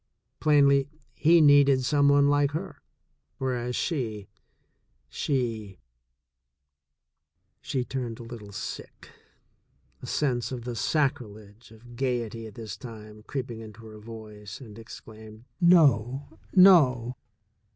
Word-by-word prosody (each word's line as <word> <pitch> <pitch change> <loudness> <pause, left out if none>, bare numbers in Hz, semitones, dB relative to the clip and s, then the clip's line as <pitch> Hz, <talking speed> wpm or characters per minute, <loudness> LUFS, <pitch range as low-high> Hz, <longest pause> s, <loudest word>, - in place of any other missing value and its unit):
Plainly, 140 -2 +4 0.2
he 165 +5 +4
needed 140 -3 +5
some 140 +2 +3
one 140 0 +4
like 145 0 +2
her, 180 +4 -6 0.6
whereas 125 -2 -2
she, 110 - -3 0.8
she. 115 -8 -3 1.8
She 130 -4 -3
turned 120 -3 -5
a - - -9
little 115 -3 -10
sick, 100 - -8 0.9
a - - -8
sense 125 -5 -1
of 125 -2 -5
the 120 0 -5
sacrilege 115 -7 -2
of 120 +2 -15
gaiety 120 -3 -3
at 105 - -13
this 110 -5 -7
time 110 -3 -11
creeping 125 -4 -5
into 110 0 -12
her 110 -1 -11
voice, 105 -2 -10
and 115 -5 -12
exclaimed: 110 -1 -12 0.2
"No, 140 - +3 0.2
no!" 135 -11 +6
120 Hz, 110 wpm, -27 LUFS, 110-140 Hz, 1.8 s, no